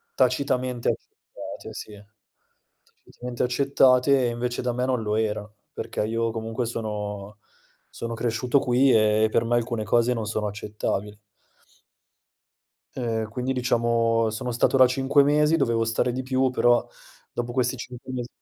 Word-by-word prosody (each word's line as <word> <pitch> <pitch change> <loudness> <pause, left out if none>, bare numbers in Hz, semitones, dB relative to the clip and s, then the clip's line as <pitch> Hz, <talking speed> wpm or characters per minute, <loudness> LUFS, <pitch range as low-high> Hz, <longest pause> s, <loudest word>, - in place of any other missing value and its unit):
tacitamente 130 -1 +1
accettate, - - -7
sì. 105 - -8 1.1
Tacitamente 125 -1 -6
accettate, 130 0 +3
e - - +1
invece 120 +1 -3
da 125 -1 -1
me 125 +1 -1
non 125 -3 0
lo 105 0 -1
era, 105 -1 -1 0.2
perché - - -3
io 115 +1 -1
comunque 115 +1 -3
sono 105 -3 -5 0.5
sono 115 0 -5
cresciuto 120 +3 +1
qui 130 +2 +3
e 110 0 +4
per - - +3
me 120 +1 +1
alcune 120 -1 -1
cose 120 +3 +2
non 115 -2 -3
sono 105 0 -2
accettabili. 105 0 -4 1.8
Uhm, 115 -3 -2
quindi 125 +3 -2
diciamo, 115 -2 +1
sono 125 +3 -4
stato 120 +3 +2
la 130 - +8
cinque 135 +3 +3
mesi, 150 +2 +3
dovevo 115 -7 +1
stare 115 +2 0
di 130 +2 -3
più 130 0 +1
però 120 -1 +3 0.4
dopo 120 0 -4
questi 125 0 0
cinque 125 +1 -9
mesi. 125 -1 -3
120 Hz, 145 wpm, -25 LUFS, 110-125 Hz, 1.8 s, la